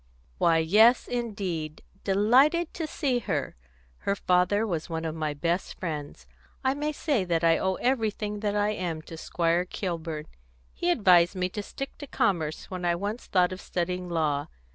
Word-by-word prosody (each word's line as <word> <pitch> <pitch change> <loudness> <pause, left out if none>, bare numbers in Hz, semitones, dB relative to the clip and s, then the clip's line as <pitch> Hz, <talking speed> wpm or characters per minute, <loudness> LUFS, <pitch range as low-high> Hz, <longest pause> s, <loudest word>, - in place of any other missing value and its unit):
"Why, 165 -1 +4
yes, 210 +10 +5
indeed! 195 -10 -3 0.2
Delighted 260 - +3
to 325 -2 -3
see 270 -5 0
her. 160 - -2 0.4
Her 200 - 0
father 185 +3 +2
was 170 -7 -3
one 165 0 -3
of 160 - -2
my 155 -2 -2
best 170 +5 -2
friends. 150 - -5 0.4
I 260 0 +2
may 295 +2 -2
say 285 - 0
that 170 -2 0
I 165 0 +4
owe 190 0 0
everything 215 -4 -1
that 205 -1 -1
I 205 0 +2
am 170 -6 -3
to 165 - -9
Squire 170 +1 0
Kilburn; 165 -4 -4 0.5
he 350 - -1
advised 185 - +5
me 180 0 -1
to 210 - -4
stick 275 +6 -7
to 290 - -7
commerce 165 - -1
when 180 -1 -5
I 175 -1 +2
once 205 +6 -4
thought 180 -1 +3
of 185 - -6
studying 180 0 -3
law. 150 -3 0
185 Hz, 170 wpm, -27 LUFS, 165-215 Hz, 0.5 s, yes